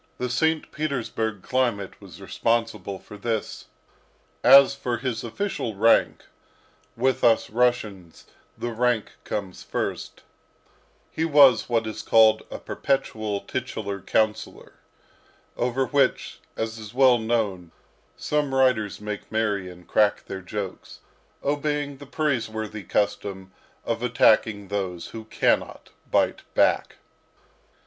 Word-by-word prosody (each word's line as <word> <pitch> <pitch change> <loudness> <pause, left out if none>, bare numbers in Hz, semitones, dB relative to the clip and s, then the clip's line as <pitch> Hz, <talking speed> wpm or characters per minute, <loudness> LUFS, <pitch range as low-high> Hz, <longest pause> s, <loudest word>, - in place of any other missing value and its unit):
The 125 -1 -3
St. 160 +3 0
Petersburg 115 -8 -3
climate 120 -7 -1
was - - -13
responsible 115 -4 -1
for 105 +2 -12
this. 110 0 -3 0.8
As 135 +1 +8
for 125 -3 -3
his 125 -1 -3
official 120 - -3
rank 115 +3 +3 0.7
with 130 +2 +1
us 115 -3 +3
Russians 110 -7 -1 0.3
the 120 - -3
rank 120 -1 0
comes 100 -3 -5
first - - -4 0.9
he 160 - -2
was 140 -8 +5
what 115 -2 +1
is 110 - -5
called 110 -1 +5
a - - -6
perpetual 110 -7 -2
titular 100 -1 -4
councillor, 110 +2 -1 0.8
over 125 +2 0
which, 140 -1 0 0.2
as 110 0 -3
is 110 +2 -10
well 130 -2 +5
known, 105 -7 -1 0.5
some 145 -3 -1
writers 125 -6 +2
make 105 0 -6
merry 105 -4 -1
and 90 -1 -14
crack 105 -1 +2
their 95 - -6
jokes, 95 0 -7 0.4
obeying 145 0 -1
the 145 0 -12
praiseworthy 110 -8 -2
custom 95 -2 -2 0.3
of 115 0 -2
attacking 110 -4 +3
those 95 -4 -3
who 110 -1 -8
cannot - - 0 0.2
bite - - +1
back. - - +2
115 Hz, 115 wpm, -25 LUFS, 105-130 Hz, 0.9 s, As